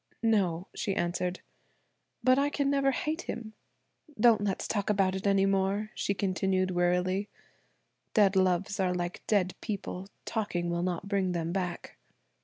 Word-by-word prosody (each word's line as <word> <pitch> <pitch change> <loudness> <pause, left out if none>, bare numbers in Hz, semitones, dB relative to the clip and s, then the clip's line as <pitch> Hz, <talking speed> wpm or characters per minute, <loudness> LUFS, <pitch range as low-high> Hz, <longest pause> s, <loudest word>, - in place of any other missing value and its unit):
"No," 190 -6 +2
she 195 -4 -2
answered. 175 +1 -1 0.8
"But 255 +2 +5
I 285 +1 +2
can 280 -1 0
never 275 -1 +3
hate 305 +5 -1
him. 225 -7 -6 0.7
Don't 225 -2 +6
let's 195 -2 -1
talk 205 -2 -1
about 195 -2 +2
it 190 +1 -2
any 195 -1 +4
more," 195 +2 0
she 200 - -1
continued 185 -1 0
wearily. 180 +3 +1 0.9
"Dead 205 -3 +5
loves 190 +1 +2
are 180 -1 +1
like 175 0 -3
dead 190 -4 +2
people–talking 195 -2 -4
will 170 0 -1
not 180 +1 -2
bring 195 -3 0
them 170 -1 -2
back." 180 -2 -4
195 Hz, 145 wpm, -30 LUFS, 180-210 Hz, 0.9 s, Don't